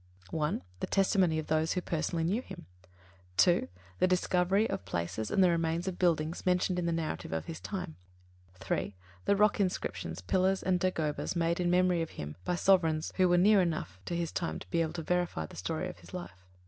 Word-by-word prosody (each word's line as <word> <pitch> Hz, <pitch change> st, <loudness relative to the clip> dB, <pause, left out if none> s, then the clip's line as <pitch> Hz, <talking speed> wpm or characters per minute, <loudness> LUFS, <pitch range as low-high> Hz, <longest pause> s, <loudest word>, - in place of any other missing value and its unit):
(1) 150 Hz, -, -1 dB, 0.2 s
The -, -, -2 dB
testimony 190 Hz, -4 st, +2 dB
of 155 Hz, -, -2 dB
those 155 Hz, +1 st, +1 dB
who 180 Hz, -, -1 dB
personally 165 Hz, 0 st, -1 dB
knew 195 Hz, +9 st, +1 dB
him. 255 Hz, -, -10 dB, 0.7 s
(2) 175 Hz, -1 st, +4 dB, 0.3 s
The -, -, +4 dB
discovery 185 Hz, +3 st, +2 dB
of -, -, -3 dB
places 95 Hz, +4 st, -3 dB
and 195 Hz, -, +3 dB
the 180 Hz, -, +5 dB
remains 165 Hz, +1 st, 0 dB
of 185 Hz, -, -3 dB
buildings 165 Hz, -2 st, +1 dB
mentioned 180 Hz, 0 st, +1 dB
in 170 Hz, -, -1 dB
the -, -, +1 dB
narrative 165 Hz, -, -3 dB
of 80 Hz, 0 st, -2 dB
his 160 Hz, -, -6 dB
time. 180 Hz, -5 st, -5 dB, 0.6 s
(3) 95 Hz, +2 st, -3 dB, 0.3 s
The 200 Hz, -, +4 dB
rock 210 Hz, +1 st, +3 dB
inscriptions, 90 Hz, -, -2 dB
pillars 185 Hz, -, +1 dB
and 185 Hz, -1 st, +2 dB
dagobas 165 Hz, -4 st, -1 dB
made 170 Hz, 0 st, +1 dB
in 175 Hz, -1 st, +1 dB
memory 180 Hz, -1 st, +3 dB
of 165 Hz, -, -3 dB
him 75 Hz, 0 st, -5 dB
by 180 Hz, -, 0 dB
sovereigns 165 Hz, -4 st, +2 dB
who 185 Hz, -1 st, +4 dB
were 175 Hz, -, +4 dB
near 200 Hz, +2 st, +6 dB
enough 155 Hz, -, -2 dB
to 170 Hz, -, -3 dB
his 170 Hz, -1 st, -2 dB
time 170 Hz, -, -2 dB
to -, -, -11 dB
be 170 Hz, -2 st, +2 dB
able 160 Hz, -1 st, -1 dB
to 170 Hz, -2 st, -4 dB
verify 175 Hz, -, 0 dB
the -, -, -12 dB
story 155 Hz, -, -3 dB
of -, -, -9 dB
his -, -, -11 dB
life. 95 Hz, -, -9 dB
170 Hz, 205 wpm, -31 LUFS, 155-185 Hz, 0.7 s, near